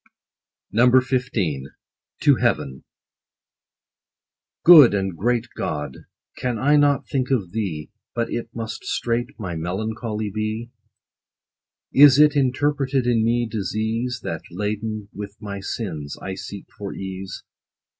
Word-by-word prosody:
6o 125 +3 +6 0.3
XV. 75 - -2 0.2
— - - -41
TO - - +6
HEAVEN. 65 0 -1 1.8
Good 150 -11 +9
and 95 -3 -1
great 120 +5 0
GOD! 75 -3 -4 0.3
can 125 -2 -2
I 145 +6 +3
not 145 -1 +3
think 130 -2 -1
of 105 -10 0
thee, 90 -8 -4 0.2
But 115 -1 -1
it 115 -1 -3
must 115 -1 -6
straight 120 +2 -2
my 90 -5 -4
melancholy 105 +5 -3
be? 110 +2 -3 1.2
Is 140 -1 +8
it 150 0 +6
interpreted 135 -1 +1
in 120 -2 +2
me 120 +1 +1
disease, 110 +4 -2
That, 80 -1 -4
laden 105 +2 -4
with 100 0 -8
my 100 -1 -6
sins, 85 -8 -5
I 95 - -5
seek 100 +1 -8
for 100 -1 -5
ease 95 -1 -6
110 Hz, 125 wpm, -23 LUFS, 95-125 Hz, 1.8 s, Good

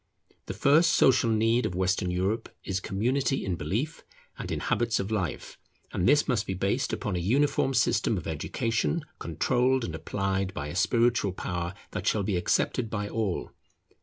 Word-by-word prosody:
The - - -4
first 155 +4 +4
social 125 -3 +4
need 115 +2 +2
of 90 - -6
Western 95 0 0
Europe 95 +5 -1
is 95 -1 -2
community 130 +9 0
in 95 -2 -1
belief 115 - -3 0.3
and - - -6
in - - -2
habits 115 -2 +1
of 100 +2 -3
life; 95 -9 -3 0.3
and 90 - +2
this 145 0 +4
must 120 -6 0
be 95 - -2
based 95 +2 0
upon - - -2
a - - 0
uniform 135 +7 +1
system 115 -3 +2
of 85 - -5
education 115 - -1
controlled 125 - +1
and 85 - -5
applied 95 +3 -2
by 70 +1 -4
a 75 - -6
spiritual 115 +1 +2
power 90 0 -4 0.2
that - - -4
shall 105 - +2
be 100 -1 -1
accepted 110 +6 0
by 105 -2 -3
all. 105 -5 -2
105 Hz, 170 wpm, -28 LUFS, 90-120 Hz, 0.3 s, first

